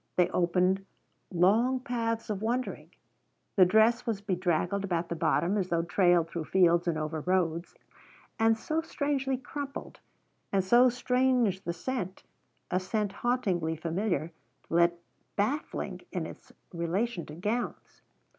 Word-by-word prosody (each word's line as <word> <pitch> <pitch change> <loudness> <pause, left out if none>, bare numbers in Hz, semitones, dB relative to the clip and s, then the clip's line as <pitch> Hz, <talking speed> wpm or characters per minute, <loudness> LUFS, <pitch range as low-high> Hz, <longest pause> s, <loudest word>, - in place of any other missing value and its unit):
They 180 -1 +3
opened 180 +2 +2 0.5
long 215 +9 +3
paths 230 -3 -2
of 200 -1 -3
wondering. 245 +3 -2 0.7
The 185 - +7
dress 225 +5 +4
was 220 -4 0
bedraggled 185 -1 0
about 175 -3 -1
the 170 - -2
bottom, 180 +4 +1
as 185 -1 -2
though 170 -1 +1
trailed 175 -1 +3
through 165 -1 -5
fields 175 -1 +3
and 165 -2 +1
over 155 +1 -3
roads. 170 -1 0 0.6
And 225 0 +4
so 310 +8 -1
strangely 280 -4 -1
crumpled, 280 +2 -7 0.5
and 195 -1 +2
so 240 +6 +6
strange 250 -5 +1
the 170 - -3
scent 190 0 -4 0.5
a 185 - +2
scent 205 +2 -1
hauntingly 195 -8 0
familiar, 170 +1 -1 0.4
yet 170 +1 +4 0.4
baffling 265 +10 -2
in - - -2
its - - -11 0.2
relation 175 +3 -2
to 150 - -9
gowns. 210 +8 -3
195 Hz, 135 wpm, -29 LUFS, 175-240 Hz, 0.7 s, The